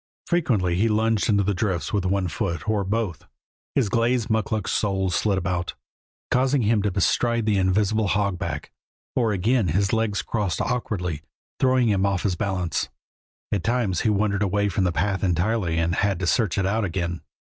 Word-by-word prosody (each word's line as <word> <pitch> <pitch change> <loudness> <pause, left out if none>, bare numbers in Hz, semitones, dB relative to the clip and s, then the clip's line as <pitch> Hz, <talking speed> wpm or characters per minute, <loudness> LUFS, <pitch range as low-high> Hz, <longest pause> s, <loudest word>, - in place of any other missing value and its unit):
Frequently 115 - +1
he 100 +6 +2
lunged 110 0 +1
into 100 -2 +3
the 100 +1 0
drifts 90 -5 -2
with 100 -3 0
one 95 0 +1
foot, 85 +1 -3
or 105 -2 +1
both; 100 -4 -2 0.5
his 130 -6 +2
glazed 115 +2 +1
mukluk 110 -2 0
soles 95 -3 0
slid 100 +2 +1
about, 90 -1 -2 0.6
causing 130 +1 +2
him 110 0 +2
to 105 - +1
bestride 115 +4 +1
the 105 -2 +2
invisible 100 +3 +2
hogback, 100 -1 -1 0.4
or 115 -4 +2
again 105 +3 +1
his 100 +6 +1
legs 110 -2 0
crossed 105 -6 -2
awkwardly, 90 -10 -2 0.4
throwing 130 -2 +3
him 100 -2 +2
off 100 -3 0
his 95 -4 +1
balance. 90 -2 -2 0.6
At 100 -5 0
times 115 -6 0
he - - +2
wandered 100 -1 +1
away 100 +1 +1
from 95 0 0
the 90 - +2
path 95 +4 -1
entirely 90 -1 +1
and 85 +1 +1
had 100 -1 +1
to 90 - -3
search 105 +2 +1
it 95 - +1
out 105 +3 +1
again. 85 -2 -2
100 Hz, 175 wpm, -24 LUFS, 90-110 Hz, 0.6 s, into